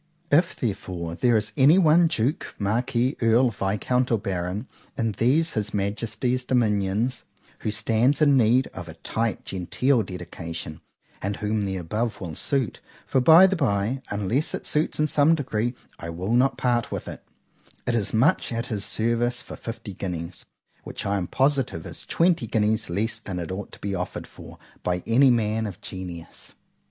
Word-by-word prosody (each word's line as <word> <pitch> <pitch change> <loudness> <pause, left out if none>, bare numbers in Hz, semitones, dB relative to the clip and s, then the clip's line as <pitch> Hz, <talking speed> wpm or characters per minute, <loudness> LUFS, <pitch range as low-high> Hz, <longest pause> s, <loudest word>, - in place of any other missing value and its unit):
If 165 +4 +4
therefore 90 -7 -3
there 120 +6 +3
is 105 0 -2
any 145 +6 +6
one 170 -1 +5
Duke, 135 0 -1
Marquis, 120 +5 0
Earl, 115 +2 +4
Viscount, 110 +5 0
or 115 - +4
Baron, 95 +3 -3 0.3
in 115 -1 0
these 140 +10 +2
his 105 -1 -2
Majesty's 115 +5 -1
dominions, 115 -1 0 0.3
who - - -2
stands 115 +5 +2
in 145 -3 +5
need 125 +1 +4
of 85 -2 -7
a 80 - -9
tight, 110 +5 -2
genteel 115 +8 +1
dedication, 85 -5 -7 0.4
and 100 +1 -2
whom 105 0 -1
the 95 -1 -2
above 105 +7 -2
will 85 -4 -6
suit, 130 - -1 0.3
(for 130 - +1
by 165 +7 +8
the 190 0 +2
bye, 125 - 0
unless 105 +9 0
it - - -7
suits 150 0 0
in 150 - +4
some 155 +2 +4
degree, 120 -4 -2 0.2
I 85 - -6
will 90 +6 -3
not 130 +3 +3
part 120 -2 0
with - - -4
it)——it 125 - -9
is 110 -4 0
much 130 +10 +2
at 115 0 -2
his 105 -1 -2
service 120 +3 0
for - - -9
fifty 115 -3 -7
guineas;——which 90 -2 -7
I 100 0 +1
am 90 -3 -2
positive 135 - 0
is - - -6
twenty 165 -8 +2
guineas 110 -2 +1
less 105 +6 -1
than 95 -2 -6
it 85 0 -4
ought 95 +2 -5
to - - -8
be 100 -1 -3
afforded 90 -1 -4
for, - - -13 0.2
by 90 0 -1
any 130 +4 +5
man 110 -2 +1
of 95 -4 -8
genius. 90 -3 -8
110 Hz, 165 wpm, -25 LUFS, 100-130 Hz, 0.4 s, by